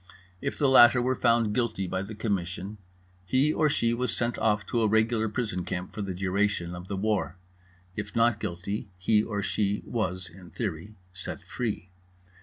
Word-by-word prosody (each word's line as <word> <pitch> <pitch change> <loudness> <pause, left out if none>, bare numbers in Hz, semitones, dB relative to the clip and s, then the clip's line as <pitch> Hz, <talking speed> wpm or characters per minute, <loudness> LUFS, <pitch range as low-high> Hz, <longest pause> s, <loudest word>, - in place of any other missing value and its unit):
If - - -2
the 145 - +3
latter 125 -1 +8
were 130 +1 +1
found 115 -4 +3
guilty 115 -5 0
by 95 +1 -2
the 100 +2 -6
Commission, 100 -1 -3 0.4
he 130 +10 +2
or 155 - +3
she 115 -5 +1
was 125 +2 -1
sent 120 0 -1
off 105 -2 +2
to 115 +4 0
a 110 - +4
regular 110 +1 +2
prison 105 -6 -2
camp 90 +1 -4
for 105 - -4
the 95 -2 -3
duration 95 -1 0
of 90 +1 -8
the 100 - -3
war; 100 -3 0 0.6
if 105 -1 -5
not 115 -2 +3
guilty, 100 +1 -4
he 105 +4 +3
or 105 -2 -3
she 105 0 0
was 90 -6 -2
(in 90 +1 -13
theory) 100 -1 -4 0.2
set 90 - -7
free. 105 -6 -4
105 Hz, 180 wpm, -28 LUFS, 95-115 Hz, 0.6 s, latter